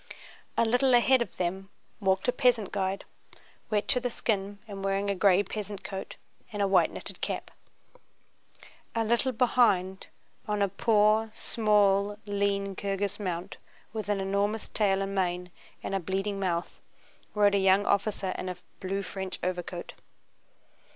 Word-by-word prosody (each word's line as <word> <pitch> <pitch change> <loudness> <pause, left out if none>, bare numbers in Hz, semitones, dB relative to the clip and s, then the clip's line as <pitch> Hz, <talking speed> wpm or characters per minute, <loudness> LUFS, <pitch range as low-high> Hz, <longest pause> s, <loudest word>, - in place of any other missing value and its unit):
A 230 - +4
little 245 +3 +4
ahead 255 +1 +5
of 235 - -4
them 190 +2 -2 0.3
walked 190 0 +1
a - - +5
peasant 245 -5 +2
guide, 195 -1 -2 0.6
wet 210 -1 0
to 250 - +4
the 245 0 -2
skin 205 -3 -2
and 200 -2 -7
wearing 195 +1 0
a - - -1
gray 195 0 +4
peasant 205 0 -6
coat 195 -1 -6 0.4
and 210 - -5
a 200 - +3
white 190 -1 +4
knitted - - -7
cap. - - -3 1.4
A 230 - +2
little 235 +4 +2
behind, 220 -6 +2 0.4
on 210 -1 +1
a 200 - +1
poor, 215 +2 +3
small, 205 -3 +2
lean 200 -1 0
Kirghíz 200 +1 -2
mount 180 -3 -4 0.4
with 215 -2 -4
an 205 -1 +1
enormous 200 +3 -1
tail 195 -2 +2
and 195 0 -4
mane 180 -2 -1 0.3
and - - -4
a 195 - +1
bleeding 195 +3 -2
mouth, 175 -3 -2 0.5
rode 205 -1 +4
a 200 - +3
young 195 +1 +4
officer 200 -2 0
in 185 - -3
a 180 - -5 0.2
blue 195 +1 -2
French 190 0 -5
overcoat. 180 -1 -3
200 Hz, 150 wpm, -29 LUFS, 190-215 Hz, 1.4 s, ahead